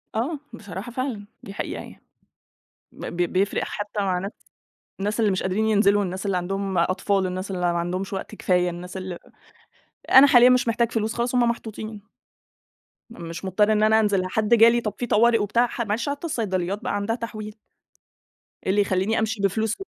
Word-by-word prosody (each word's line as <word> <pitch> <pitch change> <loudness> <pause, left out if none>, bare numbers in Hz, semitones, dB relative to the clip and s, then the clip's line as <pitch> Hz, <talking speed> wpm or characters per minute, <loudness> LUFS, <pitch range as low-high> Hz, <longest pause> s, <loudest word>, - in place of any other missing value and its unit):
آه، 275 +8 -1
بصراحة 205 0 -8
فعلًا، 240 -5 -4 0.2
دي 195 - -9
حقيقة - - -4
يعني. - - -13 0.9
ب - - -10
ب - - -6 0.2
بيفرق 195 +2 +1
حتى 205 0 -4
مع 190 -2 0
ناس 195 +2 -4 0.7
الناس 210 +3 -2
اللي 215 -3 +3
مش 190 - -1
قادرين 195 +4 0
ينزلوا، 205 -1 +3
الناس 185 +1 -4
اللي 195 -2 0
عندهم 195 +1 -2
أطفال، 190 +3 +1
الناس 185 +2 -4
اللي 180 -2 0
ما 170 - 0
عندهمش 185 +3 -3
وقت 195 +2 -5
كفاية، 180 -2 +1
الناس 180 +2 -7
ال 185 -2 -5 0.9
أنا 265 +2 +9
حاليًا 250 -2 +7
مش 250 -1 +3
محتاج 235 +1 +1
فلوس، 220 0 -1
خلاص 240 +1 -1
هُم 240 -1 +3
محطوطين. 220 -2 -6 1.0
م 225 - -12
مش 170 +3 -7
مضطر 210 +3 +2
إن 215 0 +2
أنا 220 +1 +5
أنزل، 200 -4 +1
حد 215 +3 +1
جالي 235 +1 +6
طب 210 -3 -3
في 245 - -3
طوارئ 230 +2 +4
وبتاع، 230 +4 +1
معلش 230 +4 -1
حتى 285 +4 -4
الصيدليات 200 - -2
بقى - - -2
عندها 205 +3 -1
تحويل. 215 -3 -7 1.1
إيه - - -1
اللي 205 - +3
يخلّيني 195 +2 0
أمشي 220 -1 -1
بفلوس 215 +3 0
205 Hz, 180 wpm, -24 LUFS, 190-230 Hz, 1.1 s, أنا